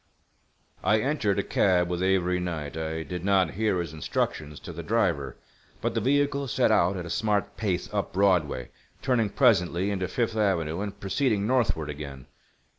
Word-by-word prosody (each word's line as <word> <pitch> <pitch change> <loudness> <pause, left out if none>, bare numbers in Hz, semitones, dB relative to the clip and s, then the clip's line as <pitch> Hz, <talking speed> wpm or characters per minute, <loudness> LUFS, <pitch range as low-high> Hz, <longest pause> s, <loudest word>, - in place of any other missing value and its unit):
I 105 +3 +4
entered 115 -6 0
a 100 - +1
cab 90 -3 +2
with 90 0 -2
Avery 90 -1 +2
Knight. 80 -5 -4
I 80 0 -3
did 90 0 -6
not 95 -4 +3
hear 105 -1 0
his 85 -3 -4
instructions 75 -1 -2
to 85 - -8
the 85 - -6
driver, 85 - 0 0.4
but - - -1
the - - 0
vehicle 140 +1 +1
set - - +2
out 90 +3 +3
at 90 - -5
a - - -7
smart 105 0 0
pace 95 -5 -1
up - - -1
Broadway, 90 -10 +1 0.3
turning 120 -5 +2
presently 95 -5 +2
into 95 -2 -1
Fifth 115 +2 -1
Avenue, 90 -5 0
and 100 -1 -5
proceeding 105 0 0
northward 105 - +1
again. 70 -3 -8
95 Hz, 170 wpm, -27 LUFS, 85-105 Hz, 0.4 s, I